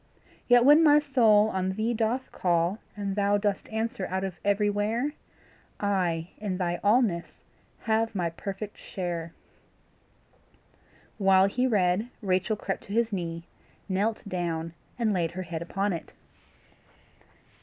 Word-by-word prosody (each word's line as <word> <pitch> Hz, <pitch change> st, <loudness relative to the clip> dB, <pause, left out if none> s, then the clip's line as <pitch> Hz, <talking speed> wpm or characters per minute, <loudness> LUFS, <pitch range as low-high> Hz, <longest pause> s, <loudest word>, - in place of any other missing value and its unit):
Yet 245 Hz, 0 st, +6 dB
when 295 Hz, +3 st, +8 dB
my 295 Hz, -2 st, +7 dB
soul 230 Hz, -8 st, +4 dB
on 190 Hz, -1 st, -1 dB
thee 220 Hz, +4 st, -1 dB
doth 235 Hz, +3 st, -1 dB
call 175 Hz, +3 st, +1 dB, 0.2 s
And 200 Hz, -1 st, -3 dB
thou 205 Hz, 0 st, +2 dB
dost 205 Hz, -1 st, -2 dB
answer 220 Hz, -3 st, -2 dB
out 190 Hz, +1 st, -2 dB
of 190 Hz, -3 st, -5 dB
everywhere, 205 Hz, +6 st, +1 dB, 0.7 s
I 180 Hz, -5 st, 0 dB
in 200 Hz, -3 st, -3 dB
thy 175 Hz, -2 st, -1 dB
allness 205 Hz, -5 st, +1 dB, 0.4 s
have 225 Hz, 0 st, 0 dB
my 175 Hz, -3 st, -1 dB
perfect 195 Hz, +4 st, -6 dB
share. 170 Hz, -3 st, -4 dB, 1.9 s
While 190 Hz, -1 st, +5 dB
he 250 Hz, +6 st, +1 dB
read 205 Hz, 0 st, +1 dB
Rachel 190 Hz, +3 st, +1 dB
crept 195 Hz, -2 st, -4 dB
to 200 Hz, -, -7 dB
his 230 Hz, -1 st, +1 dB
knee, 170 Hz, -3 st, -3 dB, 0.4 s
knelt 205 Hz, +3 st, -1 dB
down, 165 Hz, -3 st, -3 dB, 0.2 s
and 225 Hz, -3 st, +1 dB
laid 170 Hz, -3 st, 0 dB
her 185 Hz, +1 st, -4 dB
head 165 Hz, -2 st, -5 dB
upon 195 Hz, +3 st, -1 dB
it. 165 Hz, -, -7 dB
200 Hz, 135 wpm, -27 LUFS, 180-220 Hz, 1.9 s, when